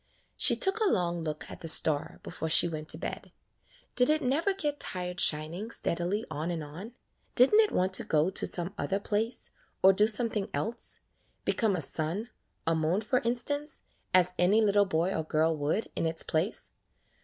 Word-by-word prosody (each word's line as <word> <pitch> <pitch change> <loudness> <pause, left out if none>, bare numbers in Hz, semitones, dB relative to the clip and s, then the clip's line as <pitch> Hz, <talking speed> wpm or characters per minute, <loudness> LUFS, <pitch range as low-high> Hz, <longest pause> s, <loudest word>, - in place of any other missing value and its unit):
She - - +3
took 385 +2 0
a 435 -3 +2
long 175 - -1
look 155 -1 -5
at - - -9
the 165 - -8
star 155 -2 +6
before 160 - -5
she 165 - +5
went 155 -2 -6
to - - +1
bed. - - -7 0.6
Did 250 +2 +3
it 310 +1 +1
never 295 +10 +1
get 295 -7 -3
tired 180 0 -4
shining 160 +8 0
steadily 185 +1 -2
on 155 +3 -4
and 165 -3 -3
on? 175 +11 -10 0.4
Did 250 +10 +6
n't 435 - +7
it 430 - 0
want 185 +1 0
to - - +4
go 155 +4 +1
to - - 0
some 175 +2 0
other 195 +1 -1
place, 220 +4 -3 0.3
or 190 +1 +7
do 210 +3 +3
something 220 -2 0
else 230 +1 -1 0.2
— - - -41
become 215 -4 +1
a 170 - -3
sun, 170 - -1 0.3
or 165 - +2
moon 160 +5 0
for 250 +4 0
instance, 285 +6 -2 0.3
as 180 -1 +3
any 190 +5 +4
little 205 -2 +3
boy 175 0 -1
or 160 - -2
girl 160 +1 0
would 150 +9 -2
in 165 - -1
its 160 0 +2
place? 165 +7 -2
190 Hz, 190 wpm, -29 LUFS, 160-230 Hz, 0.6 s, n't